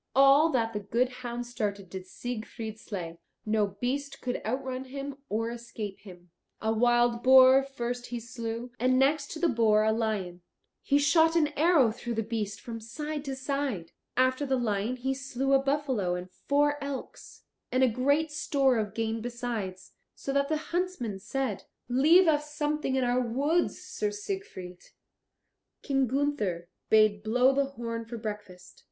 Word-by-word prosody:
All 275 Hz, +4 st, +6 dB
that 230 Hz, -6 st, 0 dB
the 210 Hz, -, -2 dB
good 230 Hz, +5 st, 0 dB
hound 245 Hz, -1 st, -5 dB
started 205 Hz, -5 st, -3 dB
did 190 Hz, -1 st, -7 dB
Siegfried 220 Hz, 0 st, -6 dB
slay; 170 Hz, -6 st, -6 dB, 0.3 s
no 215 Hz, -1 st, +2 dB
beast 275 Hz, +3 st, -2 dB
could 250 Hz, -1 st, -3 dB
outrun 260 Hz, +2 st, -3 dB
him 275 Hz, +1 st, -6 dB
or 225 Hz, +2 st, -1 dB
escape 230 Hz, -4 st, -7 dB
him. 180 Hz, -3 st, -14 dB, 0.3 s
A 220 Hz, 0 st, 0 dB
wild 240 Hz, +1 st, +3 dB
boar 260 Hz, +1 st, +8 dB
first 245 Hz, -2 st, -4 dB
he 240 Hz, -, -4 dB
slew, 235 Hz, 0 st, -5 dB
and 255 Hz, +1 st, +3 dB
next 280 Hz, +2 st, +2 dB
to 320 Hz, -, -6 dB
the 345 Hz, -, +3 dB
boar 220 Hz, -5 st, +3 dB
a 220 Hz, -, +3 dB
lion; 210 Hz, -6 st, -2 dB, 0.4 s
he 280 Hz, -, +2 dB
shot 320 Hz, +3 st, +4 dB
an 310 Hz, -3 st, +3 dB
arrow 300 Hz, -5 st, +4 dB
through 240 Hz, +1 st, -5 dB
the 225 Hz, -, 0 dB
beast 210 Hz, -2 st, -3 dB
from 230 Hz, -1 st, -6 dB
side 295 Hz, +6 st, -5 dB
to 270 Hz, -1 st, -3 dB
side. 265 Hz, -, -3 dB, 0.3 s
After 255 Hz, +2 st, +3 dB
the 265 Hz, -2 st, +1 dB
lion 220 Hz, 0 st, -1 dB
he 265 Hz, +2 st, -1 dB
slew 270 Hz, 0 st, -1 dB
a 270 Hz, -, +5 dB
buffalo 270 Hz, -10 st, 0 dB
and 180 Hz, +1 st, -7 dB
four 290 Hz, +7 st, +1 dB
elks, 280 Hz, -2 st, -7 dB, 0.3 s
and 255 Hz, +1 st, +3 dB
a -, -, +6 dB
great 285 Hz, +6 st, +1 dB
store 275 Hz, -5 st, +2 dB
of 210 Hz, -1 st, -3 dB
game 225 Hz, 0 st, -1 dB
besides, 230 Hz, -6 st, -5 dB, 0.2 s
so 275 Hz, -, -4 dB
that 280 Hz, 0 st, +1 dB
the 310 Hz, -, +1 dB, 0.2 s
huntsmen 345 Hz, -, -2 dB
said, 215 Hz, +1 st, -3 dB, 0.2 s
"Leave 310 Hz, +9 st, +5 dB
us 300 Hz, -1 st, +1 dB
something 300 Hz, -2 st, -1 dB
in 260 Hz, -, +2 dB
our 245 Hz, +1 st, +2 dB
woods, 280 Hz, +8 st, 0 dB
Sir 425 Hz, -, -2 dB
Siegfried." 390 Hz, -, -6 dB, 1.0 s
King 270 Hz, -2 st, +1 dB
Gunther 230 Hz, -11 st, -1 dB, 0.2 s
bade 215 Hz, -1 st, +5 dB
blow 250 Hz, +5 st, +3 dB
the 280 Hz, +1 st, +2 dB
horn 230 Hz, -4 st, -5 dB
for 235 Hz, +1 st, -7 dB
breakfast. 205 Hz, -5 st, -8 dB
245 Hz, 165 wpm, -29 LUFS, 220-275 Hz, 1.0 s, boar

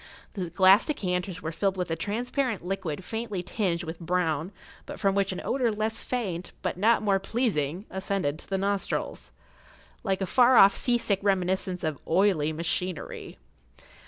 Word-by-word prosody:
The 185 Hz, -5 st, -4 dB
glass 190 Hz, +3 st, +6 dB
decanters 180 Hz, -, -2 dB
were 160 Hz, -, -2 dB
filled 195 Hz, +3 st, -1 dB
with 180 Hz, -2 st, -2 dB
a -, -, +1 dB
transparent 225 Hz, -, -2 dB
liquid 185 Hz, -3 st, -3 dB
faintly 220 Hz, -3 st, -4 dB
tinged 180 Hz, -4 st, -1 dB
with 165 Hz, 0 st, -6 dB
brown, 170 Hz, -1 st, -1 dB, 0.4 s
but -, -, -7 dB
from 195 Hz, -1 st, +2 dB
which 195 Hz, 0 st, +1 dB
an 185 Hz, -, -4 dB
odor 250 Hz, -3 st, +1 dB
less 220 Hz, +1 st, -1 dB
faint, 190 Hz, -9 st, -3 dB
but -, -, -1 dB
not 220 Hz, +5 st, +3 dB
more 195 Hz, -2 st, +3 dB
pleasing, 195 Hz, -, -1 dB
ascended 190 Hz, -6 st, -2 dB
to -, -, -13 dB
the 195 Hz, -, 0 dB
nostrils, 200 Hz, 0 st, -2 dB, 0.7 s
like 195 Hz, -4 st, 0 dB
a -, -, +1 dB
far 250 Hz, +6 st, +5 dB
off 200 Hz, -3 st, +8 dB
sea 245 Hz, -1 st, +2 dB
sick 200 Hz, -4 st, 0 dB
reminiscence 190 Hz, -2 st, 0 dB
of 155 Hz, -3 st, -2 dB
oily 170 Hz, -4 st, +3 dB
machinery. 170 Hz, +2 st, -3 dB
190 Hz, 160 wpm, -27 LUFS, 175-210 Hz, 0.7 s, off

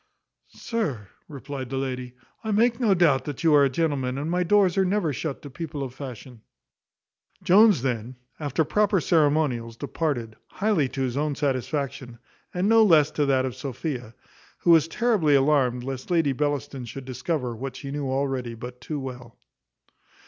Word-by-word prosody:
"Sir," 145 Hz, -, -3 dB, 0.2 s
replied 140 Hz, -3 st, -7 dB
the 135 Hz, -, -3 dB
lady, 125 Hz, -2 st, -4 dB, 0.3 s
"I 220 Hz, -, -4 dB
make 230 Hz, +3 st, +2 dB
no 215 Hz, -6 st, +3 dB
doubt 150 Hz, -7 st, +3 dB
that 145 Hz, +1 st, -6 dB
you 160 Hz, -2 st, +4 dB
are 145 Hz, -1 st, +6 dB
a 140 Hz, -, +3 dB
gentleman, 135 Hz, -3 st, -1 dB
and 150 Hz, +4 st, -3 dB
my 180 Hz, +1 st, +1 dB
doors 190 Hz, 0 st, +3 dB
are 195 Hz, -, +3 dB
never 185 Hz, -5 st, 0 dB
shut 140 Hz, +1 st, -4 dB
to 145 Hz, -, -9 dB
people 150 Hz, 0 st, -5 dB
of 130 Hz, -2 st, -6 dB
fashion." 130 Hz, -3 st, -9 dB, 1.0 s
Jones 200 Hz, -, +5 dB
then, 125 Hz, -1 st, -2 dB, 0.2 s
after 150 Hz, +1 st, 0 dB
proper 210 Hz, +2 st, +2 dB
ceremonials, 145 Hz, -8 st, +1 dB
departed, 135 Hz, -6 st, -3 dB
highly 195 Hz, -10 st, 0 dB
to 135 Hz, -, -5 dB
his 130 Hz, 0 st, -1 dB
own 150 Hz, 0 st, 0 dB
satisfaction, 135 Hz, -2 st, -2 dB, 0.3 s
and 180 Hz, +2 st, 0 dB
no 225 Hz, 0 st, +6 dB
less 155 Hz, -7 st, +5 dB
to 145 Hz, -2 st, 0 dB
that 130 Hz, -1 st, +2 dB
of 130 Hz, -2 st, -4 dB
Sophia; 130 Hz, -2 st, -5 dB, 0.4 s
who 170 Hz, -, +2 dB
was 165 Hz, -2 st, +6 dB
terribly 180 Hz, -6 st, +2 dB
alarmed 135 Hz, -3 st, +2 dB
lest 130 Hz, +2 st, -6 dB
Lady 165 Hz, -6 st, +2 dB
Bellaston 145 Hz, -2 st, -2 dB
should 130 Hz, +3 st, -8 dB
discover 130 Hz, -1 st, -3 dB
what 135 Hz, +3 st, -6 dB
she 140 Hz, -, -7 dB
knew 145 Hz, -1 st, -3 dB
already 130 Hz, -3 st, -2 dB
but 125 Hz, +2 st, -9 dB
too 150 Hz, +4 st, -4 dB
well. 125 Hz, -3 st, -8 dB
140 Hz, 170 wpm, -25 LUFS, 130-165 Hz, 1.0 s, are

